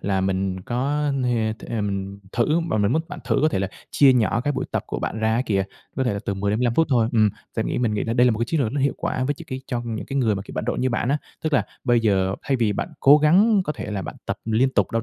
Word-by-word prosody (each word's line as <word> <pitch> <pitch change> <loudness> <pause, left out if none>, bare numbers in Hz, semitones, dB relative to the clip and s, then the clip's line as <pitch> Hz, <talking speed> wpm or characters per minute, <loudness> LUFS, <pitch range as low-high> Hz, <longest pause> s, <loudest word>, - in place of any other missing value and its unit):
là 95 -1 0
mình 95 0 -1
có 140 +8 -1
ha 115 -3 +1
th - - -11
ừm, 100 -2 -3
thử 150 +8 +2
và 110 - 0
mình 105 +2 +2
muốn 160 +3 +1
bạn 180 - -7
thử - - +1
có 155 - +5
thể 150 - -1
là 95 0 -1 0.2
chia 140 -2 +6
nhỏ 115 -1 +2
cái 145 +3 -1
buổi - - -2
tập - - 0
của - - -4
bạn 110 - -3
ra 110 0 +1
á 120 - +1
kìa, 100 -2 +1 0.3
có 130 - 0
thể 120 - +1
là 100 - -2
từ 100 - -1
10 100 +1 -1
đến 105 - 0
15 120 -1 +1
phút 165 - +3
thôi. 115 -4 +3
Ừm, 110 -3 +4 0.3
và - - +1
nghĩ - - -2
mình 115 -4 0
nghĩ 105 - -1
đây 120 +2 +3
là 125 - +5
một 110 - -1
cái 115 - +1
chiến 155 +5 -1
lược 120 -4 0
nó 140 - -1
hiệu 140 0 +1
quả 130 - -2
với 145 - 0
cho - - -11
cái 130 -1 -5
cho 120 -1 -2
những 115 -2 -4
cái 140 - -4
người 115 -6 +2
mà, 100 - -4
kiểu, - - -11
bận - - -2
rộn - - -1
như 130 - +1
bạn 120 0 -1
á. 145 +2 +2 0.2
Tức 155 - -1
là 145 - +3 0.2
bây 120 -2 +3
giờ 95 -4 +2
thay 135 -2 0
vì 115 -4 +1
bạn 170 - -3
cố 145 +2 +7
gắng 195 +8 +5
có 150 - -2
thể 110 - -6
là 100 -2 -3
bạn - - -6
tập - - -3
liên 115 +4 +2
tục 100 -7 +1
đâu 115 0 0
120 Hz, 315 wpm, -23 LUFS, 105-135 Hz, 0.3 s, cố